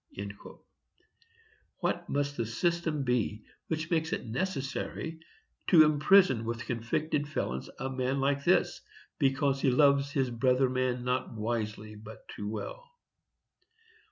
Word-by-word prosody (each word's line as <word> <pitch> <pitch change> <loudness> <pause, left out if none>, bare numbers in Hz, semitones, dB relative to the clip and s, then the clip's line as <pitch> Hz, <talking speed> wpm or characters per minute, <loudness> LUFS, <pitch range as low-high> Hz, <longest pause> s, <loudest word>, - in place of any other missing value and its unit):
What - - -1
must 145 0 -1
that 115 - -1
system 165 +4 0
be 115 -4 -1 0.2
which 160 +1 -3
makes 160 -1 +1
it - - -2
necessary 160 +3 -3 0.5
to 165 -4 +8
imprison 150 - +4
with 115 +1 -4
convicted 145 +6 -1
felons 65 - -3
a 130 - -3
man 130 +1 -1
like 140 +1 +1
this, - - +2 0.4
because 135 0 +2
he - - +3
loves 140 +1 +4
his 135 -3 0
brother 125 +2 +2
man 130 -1 0
"not 125 +1 -1
wisely 110 -1 -3
but 105 +1 -12
too 105 0 -5
well"? 110 - -6
135 Hz, 125 wpm, -30 LUFS, 115-145 Hz, 0.5 s, to